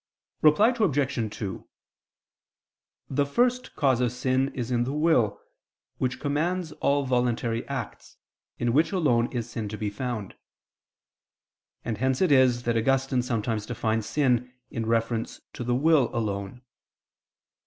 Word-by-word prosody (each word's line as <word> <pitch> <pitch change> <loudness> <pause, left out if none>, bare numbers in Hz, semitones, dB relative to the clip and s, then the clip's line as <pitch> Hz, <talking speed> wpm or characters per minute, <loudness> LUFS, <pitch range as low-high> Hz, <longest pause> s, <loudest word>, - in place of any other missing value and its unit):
Reply 155 +9 +6
Obj. 140 - 0
2: 95 -4 -5 1.4
The 140 +1 +1
first 245 - 0
cause 130 -4 +2
of 120 -2 +1
sin 130 +2 0
is 125 -1 -3
in 120 -1 +2
the 130 +3 -3
will, 150 -10 +2 0.6
which 130 0 -1
commands 160 +4 -1
all 140 -1 0
voluntary 120 -2 0
acts, 135 -5 -6 0.4
in 120 -1 0
which 155 +5 +3
alone 125 -11 +2
is 120 -3 -3
sin 115 -3 -5
to 105 - -5
be 105 -1 -3
found: 110 -3 -4 1.5
and 110 -3 -3
hence 130 +1 +1
it 185 -5 +3
is 130 -3 +4
that 120 -1 0
Augustine 135 +2 +1
sometimes 110 -3 -2
defines 110 -2 -1
sin 125 -2 +1 0.2
in 115 -1 -3
reference 115 0 -1
to - - -5
the 120 0 0
will 145 -1 +4
alone. 105 +1 -3
125 Hz, 135 wpm, -26 LUFS, 115-140 Hz, 1.5 s, Reply